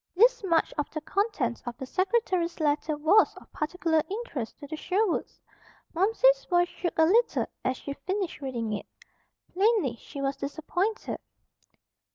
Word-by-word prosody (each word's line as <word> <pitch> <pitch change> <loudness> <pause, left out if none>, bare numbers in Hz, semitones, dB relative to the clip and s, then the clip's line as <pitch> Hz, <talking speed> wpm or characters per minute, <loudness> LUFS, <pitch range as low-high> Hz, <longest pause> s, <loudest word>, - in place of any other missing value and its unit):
This 480 +4 +5
much 335 -4 +2
of 295 - -1
the 310 - -4
contents 330 - -1
of 240 0 -4
the 265 - -5
secretary's 370 - 0
letter 300 0 +1
was 330 +9 +4
of - - -16
particular 320 0 +1
interest 385 - -4
to 290 - -9
the 305 +2 -5
Sherwoods. 375 +4 -1 0.5
Momsey's 450 +8 +4
voice 350 -1 +2
shook 345 - -4
a 320 - +6
little 460 +8 +3 0.2
as 255 0 0
she 280 - -5
finished 370 +4 -3
reading 235 -5 -3
it. 205 - -4 0.7
Plainly 385 - +2
she 285 - -10
was 275 0 -1
disappointed. 355 - -2
335 Hz, 150 wpm, -28 LUFS, 290-405 Hz, 0.7 s, a